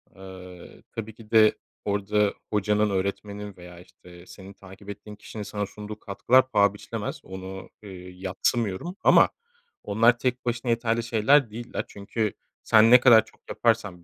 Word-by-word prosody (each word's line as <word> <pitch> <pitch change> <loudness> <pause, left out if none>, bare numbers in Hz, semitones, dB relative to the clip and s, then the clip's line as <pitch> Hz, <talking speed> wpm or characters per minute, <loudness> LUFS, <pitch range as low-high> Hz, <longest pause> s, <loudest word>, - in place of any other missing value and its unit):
Eee, 95 -2 -12
tabii 110 -1 -7
ki 110 -2 -16
de 110 -1 +5 0.3
orada 105 0 0 0.2
hocanın 105 0 +1
öğretmenin 100 +1 -4
veya, 90 -1 -12
işte, 90 0 -16
senin 95 +2 -12
takip 95 +1 -14
ettiğin 105 +1 -9
kişinin 105 0 -8
sana 105 0 -4
sunduğu 105 +2 -9
katkılar 130 +7 +2
paha 100 -1 +3
biçilemez. 105 - -6
Onu, 95 0 -9
ııı, 100 - -10 0.2
yadsımıyorum 95 - -2
ama - - +6 0.5
onlar 115 +4 +3
tek 125 -1 -2
başına 120 0 -1
yeterli 115 0 0
şeyler 120 +4 +3
değiller. 120 +2 -5
Çünkü 105 +1 -3 0.3
sen 110 +1 +5
ne 125 - +9
kadar 120 -3 +6
çok - - -23
yaparsan 105 -7 -1
105 Hz, 145 wpm, -25 LUFS, 95-115 Hz, 0.5 s, ne